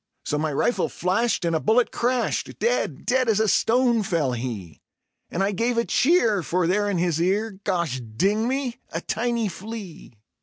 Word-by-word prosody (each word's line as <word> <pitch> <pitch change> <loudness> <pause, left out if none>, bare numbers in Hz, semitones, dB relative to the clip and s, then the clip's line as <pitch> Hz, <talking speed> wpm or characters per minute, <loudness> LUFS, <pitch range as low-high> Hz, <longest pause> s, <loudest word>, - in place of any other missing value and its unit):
So 150 - -1
my 155 0 -1
rifle 195 - +1
flashed, 190 +2 0
and 165 -1 +1
a - - +2
bullet 225 +7 +2
crashed; 245 0 -1
dead, 475 - -1
dead 255 -1 +2
as 215 -1 +3
a 220 - +2
stone 235 +2 +3
fell 165 -9 0
he, 115 - -5 0.5
And 185 - -1
I 200 - +1
gave 230 +4 0
a 235 - +2
cheer, 240 - +3
for 175 +2 0
there 205 +4 +1
in 195 - 0
his 170 -2 0
ear 200 +3 0
Gosh 170 -10 -1
ding 195 - 0
me! 260 -2 -2
a 165 - -4
tiny 235 +1 -1
flea. 195 - -8
205 Hz, 180 wpm, -24 LUFS, 170-235 Hz, 0.5 s, as